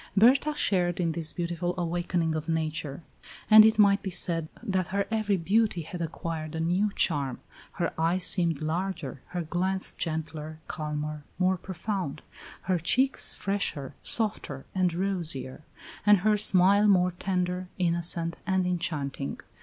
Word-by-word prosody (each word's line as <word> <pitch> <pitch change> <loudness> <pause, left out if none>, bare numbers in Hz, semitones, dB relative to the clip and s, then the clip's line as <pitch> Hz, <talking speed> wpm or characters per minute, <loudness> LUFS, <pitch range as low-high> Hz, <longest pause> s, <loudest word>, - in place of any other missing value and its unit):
Berta 270 +8 +5
shared 180 - +1
in 170 -2 +1
this 160 -1 -4
beautiful 175 0 -3
awakening 175 -1 -1
of 155 +1 -4
nature, 155 -2 -2 0.5
and 215 0 +11
it 220 0 +4
might 200 -1 +5
be 195 - -4
said 165 -3 +1 0.2
that 190 -3 -1
her 200 +1 -1
every 215 -3 +1
beauty 195 0 +1
had 170 +3 -7
acquired 165 -1 -4
a - - -3
new 180 +6 +1
charm; 140 -6 +1 0.3
her - - -2
eyes 170 +3 +1
seemed 170 -4 +3
larger, 160 -5 -3
her 175 -1 -4
glance 185 +4 -1
gentler, 155 -1 -4
calmer, 150 -1 -4
more 185 +1 +2
profound; 185 -4 -4 0.4
her 185 -2 0
cheeks 260 +11 +1
fresher, 180 -9 -2
softer, 205 - -1
and 185 -2 +2
rosier; 170 -9 -1 0.4
and 205 -2 +5
her 215 +2 +3
smile 200 0 +4
more 180 -2 +4
tender, 180 0 -2
innocent, 170 -1 -1
and 190 -1 +1
enchanting. 150 -6 -2
175 Hz, 140 wpm, -28 LUFS, 160-195 Hz, 0.5 s, and